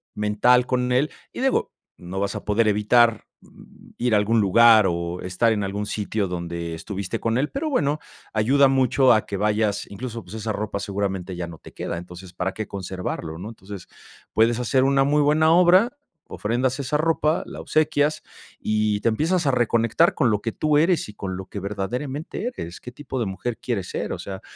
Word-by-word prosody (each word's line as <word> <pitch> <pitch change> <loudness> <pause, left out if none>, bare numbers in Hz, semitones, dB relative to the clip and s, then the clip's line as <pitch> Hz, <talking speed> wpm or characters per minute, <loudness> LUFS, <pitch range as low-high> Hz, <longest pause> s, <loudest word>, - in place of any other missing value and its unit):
mental 105 +4 +3
con 125 -1 0
él, 135 +5 +2 0.2
y - - -5
digo, 265 0 +1 0.3
no 90 +2 -6
vas 100 - -2
a - - -5
poder 110 +2 +2
evitar, 110 +2 +3 0.2
mm, - - -18
ir 120 -1 0
a - - +5
algún 110 +2 +2
lugar 110 +1 +6
o 85 +1 -3
estar 95 +6 +1
en 105 - -1
algún 100 +1 -3
sitio 105 0 -2
donde 85 -1 -4
estuviste 95 +2 -5
con 115 +1 0
él, 145 +3 0
pero 305 +3 -2
bueno, 150 - 0 0.3
ayuda 135 +6 +4
mucho 130 0 +4
a 110 - +1
que 100 - -4
vayas. 105 0 0
Incluso, 115 +2 -6
pues, 110 - -10
esa 110 0 -3
ropa 105 -1 -3
seguramente 95 -2 -3
ya 85 -1 -4
no 80 -1 -10
te - - -14
queda, - - -4
entonces, 90 +1 -10
¿para 95 +1 -2
qué 110 - -5
conservarlo, 90 -4 -5
no? 100 +5 -6
Entonces, 100 -4 -10 0.5
puedes 115 +2 +3
hacer 130 +2 +2
una 135 0 +3
muy 150 +1 +3
buena 155 +2 +4
obra, 185 - +5 0.3
ofrendas 125 +5 -1
esa 140 +2 0
ropa, 155 0 +1
la - - -8
obsequias 150 -1 +1 0.4
y 105 -1 0
te 115 - +2
empiezas 160 +8 0
a 135 - +3
reconectar 120 - +2
con 125 -7 +2
lo 105 - 0
que 115 - -2
tú 150 +4 +2
eres 170 -3 +2
y 105 - -10
con 95 -3 -5
lo 95 - -7
que 100 - -7
verdaderamente 125 - -4
eres, 85 +1 -7
¿qué 125 - -9
tipo 130 -1 -6
de 115 - -1
mujer 95 +5 -4
quieres 100 -7 -3
ser? - - -3
O - - -3
sea, 95 -1 -7
110 Hz, 200 wpm, -23 LUFS, 100-135 Hz, 0.5 s, lugar